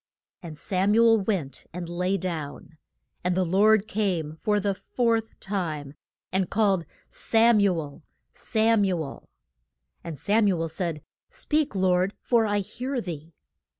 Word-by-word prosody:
And 160 -3 -9
Sam 195 +5 +1
u 230 +1 +6
el 225 -1 +5
went 190 -9 -3
and 175 0 -5
lay 180 +3 -1
down. 160 -3 -6 0.4
And 180 0 +1
the 185 - +2
Lord 205 +4 +4
came 185 -8 -1
for 210 +4 +1
the 200 0 0
fourth 225 +2 -1
time, 160 -8 -4 0.4
and 190 -1 0
called, 195 -5 +1 0.2
Sam 230 0 +3
u 195 -4 +3
el 145 -3 -8 0.3
Sam 220 -1 +2
u 180 -4 0
el! 140 - -10 0.7
And 165 -3 -6
Sam 205 - +2
u 185 -4 +1
el 165 0 -2
said, 160 -1 -3 0.3
Speak, 300 -5 -1
Lord, 185 +1 +2
for 230 -3 +2
I 205 0 +1
hear 255 +6 -4
thee. 165 -5 -7
190 Hz, 150 wpm, -26 LUFS, 170-215 Hz, 0.7 s, u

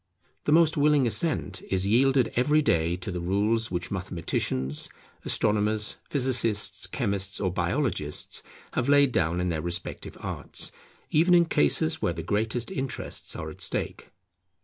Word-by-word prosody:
The - - +1
most 160 0 +5
willing 145 -2 +4
assent 120 - 0
is 95 0 +1
yielded 130 +4 +3
every 150 +5 +3
day 85 - +2
to 90 +2 -5
the 90 - -3
rules 105 +6 +1
which 90 -1 -4
mathematicians, 80 -7 -2 0.4
astronomers, 105 0 +1
physicists, 125 -6 +1
chemists, 100 -1 -2
or 95 -3 -1
biologists, 85 - -2 0.3
have 125 +2 0
laid 140 -2 +5
down 85 -4 +1
in 90 0 0
their 80 -2 -2
respective 85 +1 -3
arts, - - -3 0.4
even 170 +4 +5
in 170 -1 +5
cases 80 - +2
where 85 - +1
the 85 -1 -6
greatest 110 - -1
interests 135 -8 -4
are 80 0 -5
at - - -13
stake. - - -2
105 Hz, 145 wpm, -27 LUFS, 90-135 Hz, 0.4 s, most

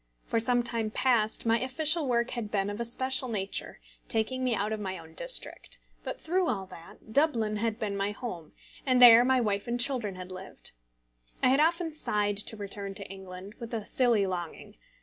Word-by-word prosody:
For 230 - +1
some 245 +1 +2
time 230 -2 0
past 230 -2 +1
my 230 0 +3
official 305 +4 +1
work 235 -1 +1
had 235 -4 -3
been 200 -1 0
of 205 - -6
a 235 - -1
special 260 +2 -1
nature, 200 -3 -3 0.3
taking 255 +3 0
me 250 -3 +2
out 210 +1 -1
of 215 - -3
my 190 -2 -4
own 160 -1 -13
district; - - -2 0.3
but - - -5
through 365 +2 0
all 195 -5 -1
that, 185 +5 -13
Dublin 230 -8 +2
had 225 0 -1
been 210 -3 -3
my 200 0 0
home, 200 -7 -6 0.3
and 255 -2 +3
there 240 -1 +10
my 260 0 +3
wife 205 -3 -1
and 240 +1 -1
children 240 -6 0
had 185 0 -8
lived. 185 +1 -10 0.7
I - - +6
had 270 +2 +4
often 330 +1 +2
sighed 210 -8 0
to 215 +2 -5
return 200 -1 -5
to - - -8
England, 190 +1 -9
with 235 -1 -5
a 215 -2 -4
silly 235 -6 +2
longing. 175 -3 -5
225 Hz, 195 wpm, -29 LUFS, 200-255 Hz, 0.7 s, there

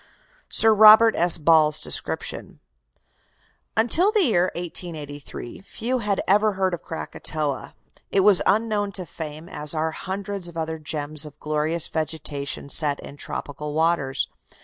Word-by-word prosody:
SIR 225 0 +6
ROBERT 220 +1 +7
S. 175 0 +7
BALL'S 155 -1 +3
DESCRIPTION - - -2 1.2
"Until 315 - +3
the 430 -3 +2
year 185 - +2
1883 155 -7 -7
few 235 +6 -4
had 205 -4 -2
ever 210 +2 +3
heard 190 -1 -1
of 175 - -5
Krakatoa. 155 -3 -5 0.3
It 195 - +2
was 200 -1 +5
unknown 205 0 0
to 185 -1 -4
fame, 155 0 -9
as 150 -2 0
are 160 +1 -1
hundreds 195 +1 -5
of 170 -1 -10
other 160 0 -4
gems 150 0 -1
of 145 - -15
glorious 155 +2 -2
vegetation 155 -3 -4
set 145 -1 +2
in - - -11
tropical 145 +1 -7
waters. 160 -5 0
165 Hz, 135 wpm, -23 LUFS, 150-200 Hz, 1.2 s, ROBERT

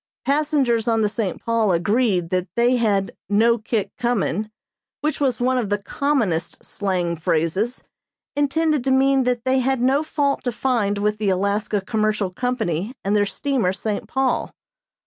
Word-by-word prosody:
Passengers 275 -5 +1
on 225 -1 +2
the 210 - +3
"St. 205 -4 -3
Paul" 230 -3 +1
agreed 185 -1 +1
that 185 0 0
they 245 +1 +3
had 205 -4 0
"no 230 +3 +3
kick 220 -1 -2
comin'," 220 -4 0 0.5
which 305 +1 -1
was 260 -5 +1
one 255 +1 +2
of 220 -5 -2
the 205 - +1
commonest 210 - -1
slang 180 -4 -1
phrases, 165 +9 -1 0.5
intended 295 0 +1
to - - +1
mean 265 0 +3
that 245 -1 -1
they 260 0 +3
had 265 0 +1
no 265 +4 +3
fault 290 -3 -1
to 245 - +1
find 230 -5 0
with 210 +1 0
the 210 -2 +1
Alaska 200 +2 0
Commercial 215 -1 0
Company 220 - -2
and 200 +2 +2
their 205 -1 +3
steamer 245 -3 0
"St. 205 +1 -3
Paul." 265 -1 0
225 Hz, 160 wpm, -22 LUFS, 200-260 Hz, 0.5 s, the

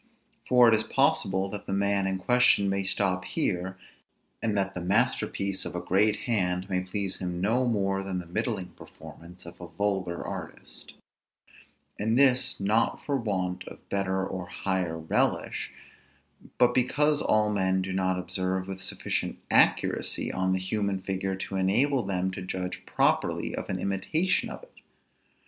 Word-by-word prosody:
For 125 -1 +7
it 115 - +6
is 110 - +4
possible 95 -7 +1
that 100 0 -7
the - - -2
man 100 0 +1
in 95 0 -1
question 125 -1 +4
may 100 0 0
stop 95 -1 +1
here, 90 0 -2 0.6
and 110 -3 0
that 95 0 0
the 90 - -5
masterpiece 95 +1 0
of - - -6
a - - -1
great 105 +3 +2
hand 95 -5 0
may 95 -2 0
please 95 +1 -3
him 90 -1 -3
no 115 +7 +1
more 95 -4 0
than 95 -1 -4
the 90 - -5
middling 95 0 -3
performance 90 +2 -14
of 85 +2 -11
a 85 - -7
vulgar 95 0 -2
artist; - - -8 1.1
and 110 +3 +1
this 130 -1 +4
not 105 +4 +1
for 140 - 0
want 95 -7 -2
of - - -12
better 95 -1 0
or 95 -2 -5
higher 90 -2 -2
relish, 80 0 0 0.9
but 125 0 +4
because 145 +4 +2
all 105 0 +2
men 95 -2 +1
do 95 0 -4
not 95 -1 +1
observe 95 +1 -1
with 95 -1 -6
sufficient - - -2
accuracy - - +2
on 95 0 0
the 95 - +2
human 100 +1 -1
figure 95 0 -2
to 95 0 -4
enable 125 +9 +2
them 95 -2 -1
to 95 - -6
judge 90 0 -5
properly - - +1
of - - -5
an - - -1
imitation 155 - 0
of - - -8
it. - - -16
95 Hz, 160 wpm, -27 LUFS, 95-105 Hz, 1.1 s, For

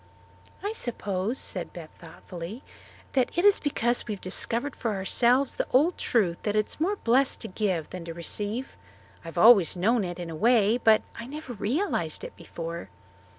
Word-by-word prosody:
"I 410 +2 -2
suppose," 210 - -2
said 180 -3 -2
Beth 165 -3 -9
thoughtfully, 175 - -9 0.5
"that 260 -2 +2
it 350 - +2
is 410 -1 +6
because 240 -5 0
we 210 - -2
have - - -14
discovered 230 +8 -2
for 225 -3 -2
ourselves 245 +7 +2
the - - -2
old 305 +8 +4
truth 185 -8 +1
that 210 -1 -1
it 215 0 +3
is - - -4
more 390 +6 +1
blessed 260 - +2
to 225 - -3
give 185 -6 -2
than 180 -2 -7
to 165 - -6
receive. 210 +8 -3 0.5
I've 165 +1 -9
always 195 -4 +6
known 220 +5 +2
it, 175 -1 -5
in 175 -2 -6
a - - -6
way, 225 +3 +3
but 220 -3 +4
I 230 - -8
never 285 -2 -7
realized 250 - -2
it - - -8
before." 170 0 -7
220 Hz, 180 wpm, -27 LUFS, 180-250 Hz, 0.5 s, is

